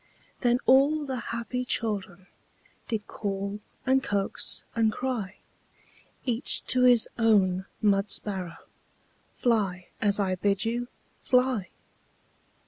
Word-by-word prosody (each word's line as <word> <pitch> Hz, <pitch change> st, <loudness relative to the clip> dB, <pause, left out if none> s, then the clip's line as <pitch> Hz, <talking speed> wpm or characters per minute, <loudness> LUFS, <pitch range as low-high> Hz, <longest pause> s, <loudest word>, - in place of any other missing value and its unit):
Then 245 Hz, -1 st, +3 dB
all 285 Hz, +3 st, +4 dB
the 260 Hz, -2 st, -3 dB
happy 235 Hz, +2 st, -3 dB
children 200 Hz, -7 st, -2 dB, 0.6 s
Did 220 Hz, -4 st, -2 dB
call, 200 Hz, 0 st, -4 dB, 0.3 s
and 265 Hz, +1 st, +3 dB
coax, 200 Hz, -1 st, -2 dB
and 225 Hz, -2 st, +3 dB
cry 220 Hz, -5 st, -3 dB, 0.9 s
Each 245 Hz, -1 st, 0 dB
to 255 Hz, -, +2 dB
his 245 Hz, -3 st, +6 dB
own 195 Hz, -4 st, +3 dB, 0.2 s
mud 200 Hz, -1 st, +3 dB
sparrow: 185 Hz, -5 st, -2 dB, 0.8 s
"Fly, 195 Hz, -7 st, 0 dB
as 205 Hz, -1 st, +3 dB
I 190 Hz, -2 st, +1 dB
bid 200 Hz, +3 st, 0 dB
you! 240 Hz, +2 st, -1 dB, 0.3 s
Fly!" 250 Hz, -6 st, +2 dB
215 Hz, 110 wpm, -27 LUFS, 195-250 Hz, 0.9 s, his